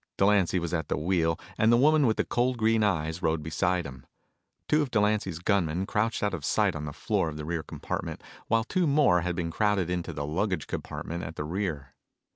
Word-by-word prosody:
Delancy 100 -2 +3
was 85 -1 -3
at 80 -2 -1
the - - 0
wheel 80 +1 +1 0.2
and 110 +1 +5
the 120 - +6
woman 150 +1 +4
with 110 - +1
the - - +1
cold 125 +1 0
green 110 0 +2
eyes 80 -4 0
rode 80 -2 0
beside 90 +3 0
him. 65 -2 -10 0.6
Two 150 - +3
of 145 - -1
Delancy's 105 -5 +1
gunmen 90 -1 0
crouched 110 +3 -1
out 105 - +1
of 85 -6 -4
sight - - +1
on 75 0 -4
the 75 - -5
floor 80 - -1
of 75 - -7
the 75 - -5
rear 85 0 -2
compartment - - -5 0.2
while 115 0 +2
two 180 - 0
more 140 - +4
had 90 0 -2
been 85 -1 -2
crowded 100 -1 +1
into 90 -1 -2
the 70 - -4
luggage 90 +2 -1
compartment 85 +2 -5
at 80 +2 -6
the - - -3
rear. 80 -5 -3
90 Hz, 215 wpm, -28 LUFS, 80-110 Hz, 0.6 s, the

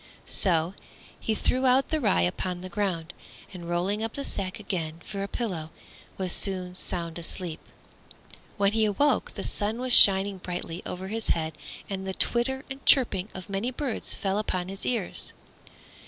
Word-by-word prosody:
So 170 -2 +2 0.5
he 220 - -1
threw 260 +4 +2
out 260 +2 +4
the 315 -1 0
rye 90 - +3
upon 175 - -1
the 185 - -7
ground, 180 -4 -2 0.4
and 170 -2 -8
rolling 185 +5 0
up 225 0 -3
the 280 - -4
sack 195 -3 -3
again 170 -6 -4
for 200 -2 -5
a 200 - -2
pillow, 185 -10 -3 0.5
was 185 -2 -1
soon 185 -2 0
sound 170 -2 -3
asleep. 170 -1 -4 1.0
When 200 -1 +3
he 220 0 +2
awoke 285 +8 +1
the - - -4
sun 215 +3 -1
was 255 -1 +1
shining 195 -2 +8
brightly 175 -2 -5
over 190 +1 -5
his 225 +1 -3
head 160 -1 0 0.3
and 190 -1 -4
the 190 - -3
twitter 265 +3 +3
and 270 0 -8
chirping 210 -7 +5
of 185 -2 -8
many 200 +5 -1
birds 255 -1 -3
fell 195 0 -1
upon 185 -4 -1
his 195 0 -5
ears. 230 -7 -1
195 Hz, 170 wpm, -27 LUFS, 180-225 Hz, 1.0 s, shining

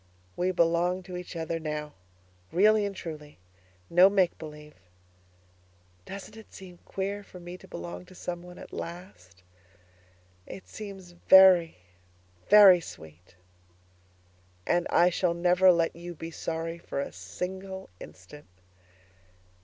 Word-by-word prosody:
We 180 +1 0
belong 175 +1 +1
to 180 0 -9
each 180 0 -8
other 165 0 -3
now 150 -1 -5 0.6
really 210 +3 +4
and 200 - -7
truly, 150 -5 -9 0.5
no 180 +3 +6
make 190 -3 +2
believe. 150 -1 -10 1.3
Doesn't 200 +2 -9
it 220 -1 -14
seem 180 -2 -12
queer 200 +1 -4
for 185 - -13
me 175 0 -9
to - - -15
belong 85 +1 -8
to - - -16
someone 180 0 -7
at - - -12
last? 90 - -9 1.0
It 190 - -10
seems 195 -4 -9
very, 180 -1 +6 0.7
very 200 -4 +9
sweet. 80 - -13 1.3
And 175 - +1
I 175 +1 +4
shall 170 -1 0
never 180 +2 +4
let 170 -1 +1
you 175 +1 -8
be 165 +1 -8
sorry 165 +1 -4
for 155 - -5
a 140 - -4
single 190 - -7
instant. 120 +12 -13
175 Hz, 125 wpm, -28 LUFS, 160-190 Hz, 1.3 s, very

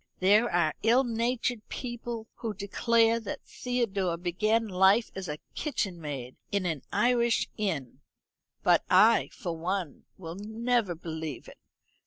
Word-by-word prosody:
There 210 +5 +5
are 170 -3 +2
ill 240 +4 +4
natured 235 -1 -1
people 240 -2 -5
who 220 -3 -4
declare 230 +3 +2
that 220 - -6
Theodore 200 -8 -1
began 215 +6 +1
life 190 +4 +4
as 190 -3 -6 0.2
kitchen 195 - -2
maid 135 -5 -5 0.2
in 200 -2 0
an 160 -6 -1
Irish 240 -1 +2
inn, 165 - -3 0.6
but - - +4
I, - - +5
for 170 -2 -5
one, 175 -1 -3
will 165 -1 -7
never 220 -2 0
believe 160 -2 -6
it. - - -13
205 Hz, 130 wpm, -29 LUFS, 175-235 Hz, 0.6 s, There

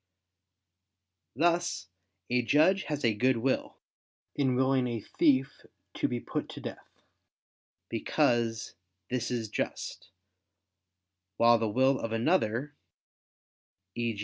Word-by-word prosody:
Thus 155 - +1 0.4
a 125 0 +3
judge 155 +10 +3
has 150 -4 -2
a 115 - +3
good 125 +4 +2
will, 130 +3 -1 0.6
in 130 -3 +1
willing 130 0 +2
a 120 -2 -2
thief 135 +3 +1 0.3
to - - 0
be 120 - -2
put - - -4
to - - -8
death, - - -10 0.8
because 115 -2 0 0.4
this 125 -2 -1
is 120 -3 -2
just: - - -4 1.3
while 120 0 +5
the 110 -1 0
will 130 +4 +3
of 115 - -4
another 125 +1 +1 1.2
e. 115 -1 -2
125 Hz, 110 wpm, -29 LUFS, 115-135 Hz, 1.3 s, while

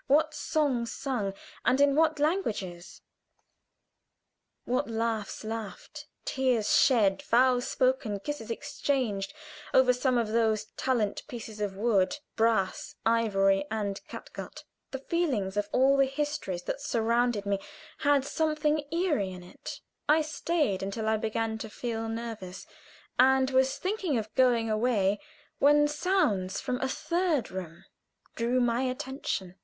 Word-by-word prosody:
what 310 +3 +3
songs 265 -9 0
sung, 250 -8 -2 0.3
and 255 +3 +3
in 285 0 +5
what 315 +1 +3
languages; 215 - -2 1.6
what 250 -1 0
laughs 225 -2 -2
laughed, 225 - -6 0.2
tears 255 -5 +1
shed, 205 -7 +4
vows 250 +1 +3
spoken, 255 -5 +1
kisses 235 0 -5
exchanged, 230 -4 -1 0.4
over 260 -1 +6
some 250 0 +1
of 230 -3 0
those 220 -1 +1
silent 230 -6 0
pieces 225 -5 -8
of 195 -2 -2
wood, 210 +1 +2 0.2
brass, 220 -4 +1
ivory, 195 -4 +3
and 205 -2 -2
catgut! - - -9 0.3
The 270 - -4
feelings 265 - -1
of 205 0 -1
all 270 +2 +4
the 275 -1 +4
histories 270 -11 -3
that 275 - -4
surrounded 235 -4 +1
me 200 -1 0 0.4
had 285 -2 +3
something 305 0 +1
eerie 330 - +1
in 180 -1 -9
it. 180 - -9 0.3
I 310 +1 +5
stayed 305 - 0
until 200 +3 -3
I 220 0 +3
began 220 0 -2
to 220 - -6
feel 225 0 -4
nervous, 220 -5 -6 0.5
and 265 +1 +5
was 265 0 +3
thinking 370 - -1
of 220 -1 -4
going 245 -3 +3
away 215 -3 +1 0.4
when 295 +1 +5
sounds 295 - +1
from 250 0 -3
a 265 - 0
third 335 -2 0
room 175 -2 -7 0.5
drew 240 +2 +1
my 240 0 +2
attention. 255 -8 -3
235 Hz, 130 wpm, -29 LUFS, 210-275 Hz, 1.6 s, over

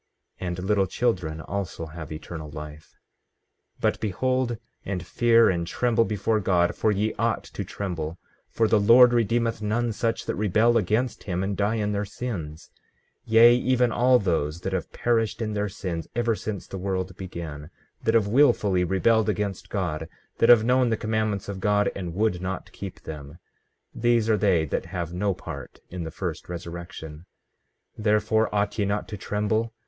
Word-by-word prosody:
15:25 95 - -4
And 90 0 -3
little 100 -1 +2
children 90 -8 -1
also 95 -2 -4
have 80 -1 -9
eternal 80 0 -7
life. 75 0 -10 0.8
15:26 - - -25
But - - +1
behold, 125 +3 0 0.3
and 95 -2 -4
fear, 115 -1 +4
and 85 -2 0
tremble 115 +3 +2
before 110 +1 0
God, 90 -3 +2
for 110 - +1
ye 105 +2 0
ought - - +1
to - - -6
tremble; 85 -4 -4 0.3
for 115 - +1
the 110 - +4
Lord 120 +4 +7
redeemeth 115 0 +1
none 115 +3 0
such 115 +1 -1
that - - -1
rebel 110 +3 +3
against 115 +4 0
him 90 -2 -1
and 100 +1 -1
die 105 +3 +1
in 105 -2 -1
their 100 0 -1
sins; 90 -9 -6 0.5
yea, 115 +2 +7
even 125 -1 +2
all 125 +2 +4
those 85 -6 -1
that 95 - -3
have 95 - -3
perished 115 -2 0
in 110 -2 -2
their 105 0 -1
sins 90 -5 -5
ever 120 -1 +1
since 105 -2 -5
the 95 - -7
world 95 -1 -2
began, 80 -5 -7 0.3
that 110 - +2
have 110 -3 +4
wilfully 105 -6 +3
rebelled 105 +5 +2
against 100 -2 -2
God, 75 +1 -3 0.3
that 115 - +4
have 120 -3 +8
known 125 +1 +3
the 110 - +1
commandments 110 -2 -1
of 100 -1 -5
God, 105 +1 +2
and 90 -3 -5
would 105 -3 +1
not 95 -1 -4
keep - - -8
them; 75 0 -8 0.6
these 120 -1 +2
are 110 - +3
they 95 -6 +3
that 70 - -3
have 85 -1 -4
no 95 +1 0
part 70 -7 -8
in 90 -2 -5
the - - -4
first 85 -1 -5
resurrection. 85 -2 -8 0.7
15:27 - - -6
Therefore 105 +1 +2
ought 100 +1 0
ye 100 - +2
not 100 +1 -1
to 105 - -6
tremble? 105 +3 -1
100 Hz, 175 wpm, -25 LUFS, 90-115 Hz, 0.8 s, have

